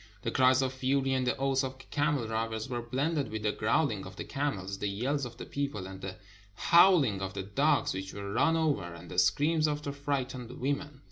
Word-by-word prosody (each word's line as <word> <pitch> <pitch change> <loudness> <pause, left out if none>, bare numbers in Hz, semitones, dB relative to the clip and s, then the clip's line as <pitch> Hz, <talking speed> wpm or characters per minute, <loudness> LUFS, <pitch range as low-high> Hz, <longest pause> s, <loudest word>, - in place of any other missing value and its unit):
The 115 - -1
cries 130 +1 +4
of 130 0 -1
fury 135 +1 +1
and 130 -1 0
the 125 - +1
oaths 135 0 +1
of 130 0 -4
the 130 - -13
camel 145 -4 +1
drivers 110 0 -2
were 120 -2 -3
blended 140 +5 -1
with 110 -1 -4
the 105 - +2
growling 110 -1 +1
of 95 - -11
the - - -5
camels, 100 -9 -3
the 105 - -1
yells 130 +8 -1
of 120 -1 -9
the - - -7
people, 140 -9 -3
and 95 0 -9
the 95 -1 -5 0.4
howling 160 - +5
of 95 0 -4
the 95 - -3
dogs 100 +1 +2
which 95 0 -5
were 100 0 -6
run 165 +7 +3
over, 140 - 0
and 85 0 -11
the 90 - +1
screams 155 - +3
of 150 0 -2
the 140 - -3
fright 140 -2 -1
ened 125 -2 -8
women. 145 +1 -2
130 Hz, 225 wpm, -30 LUFS, 105-140 Hz, 0.4 s, howling